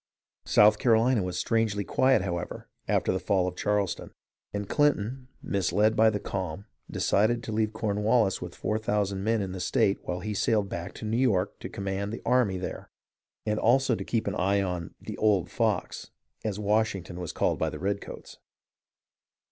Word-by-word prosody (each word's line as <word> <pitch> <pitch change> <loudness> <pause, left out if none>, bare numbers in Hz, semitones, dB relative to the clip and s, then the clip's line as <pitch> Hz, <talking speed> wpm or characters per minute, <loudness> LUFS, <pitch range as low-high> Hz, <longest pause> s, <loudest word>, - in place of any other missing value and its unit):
South 105 0 +6
Carolina 115 0 +3
was 90 -1 -3
strangely 110 -1 0
quiet, 130 -1 +3
however, 90 -2 -4 0.2
after - - +2
the 95 - -1
fall 95 -2 +1
of 90 - -4
Charleston; 105 0 -1 0.4
and 100 -1 -4
Clinton, 130 -3 +1 0.2
misled 105 +3 +1
by 110 0 +5
the 105 -1 -2
calm, 95 -1 -4 0.2
decided 115 +4 +1
to - - -5
leave 110 0 0
Cornwallis 110 0 +1
with 90 0 -7
four 110 0 -1
thousand 100 -3 -1
men 110 -1 +1
in 95 - -4
the 95 - -6
state 100 +2 +1
while 90 0 -4
he 105 +2 -3
sailed 105 0 +1
back 85 -1 -5
to - - -7
New 110 +2 0
York 105 -7 +1
to - - -6
command 100 +1 -3
the 115 - -7
army 125 -7 +2
there, 90 - -6 0.6
and 105 0 0
also 130 +2 +3
to - - -2
keep 115 -2 -1
an 100 - -1
eye 100 +2 +1
on 90 -4 -3
" - - -52
the - - -5
old 105 -5 +2
fox," - - -1 0.3
as 105 -3 -2
Wash 105 +1 +1
ington 90 -1 -8
was 90 -3 -4
called - - 0
by - - +1
the - - -7
redcoats. 100 +2 -5
105 Hz, 180 wpm, -28 LUFS, 95-110 Hz, 0.6 s, South